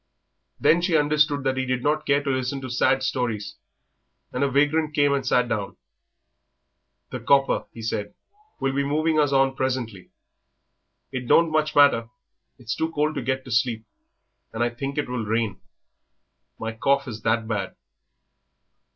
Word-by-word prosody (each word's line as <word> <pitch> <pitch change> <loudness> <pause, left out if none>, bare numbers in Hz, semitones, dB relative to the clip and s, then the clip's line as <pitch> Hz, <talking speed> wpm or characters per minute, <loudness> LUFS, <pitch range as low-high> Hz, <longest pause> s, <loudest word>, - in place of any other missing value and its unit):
Then 170 +2 +4
she 175 -2 +2
understood 150 -1 +2
that 135 -1 0
he 130 - 0
did 130 -1 -1
not 155 +1 0
care 140 0 +2
to 140 - -2
listen 130 +1 -2
to 130 -2 -6
sad 130 +2 +2
stories, 110 -6 -2 0.8
and 125 - 0
a 140 - +2
vagrant 150 +3 +1
came 145 -1 +3
and 140 -1 0
sat 125 -1 +2
down. 105 -4 -3 1.3
"The - - -4
'copper,'" 135 -1 +2
he 115 - -10
said, 105 -2 -3 0.4
"will 135 0 0
be 140 +1 0
moving 155 +2 +1
us 145 -2 +2
on 135 -1 +3
presently. 125 -8 -3 1.0
It 130 -2 -5
don't 165 +4 +4
much 155 0 0
matter; 130 -6 +5 0.5
it's 120 -3 -4
too 160 0 -2
cold 150 +1 0
to 145 - -3
get 130 0 -2
to 130 - -9
sleep, 115 -1 0 0.7
and 115 +1 -1
I 120 - 0
think 135 +4 -5
it 150 - -1
will 125 -2 -3
rain. 110 -2 -1 1.0
My 115 0 -4
cough 140 +5 +1
is 110 -3 -7
that 110 0 0
bad." 105 -4 -3
130 Hz, 165 wpm, -24 LUFS, 115-145 Hz, 1.3 s, matter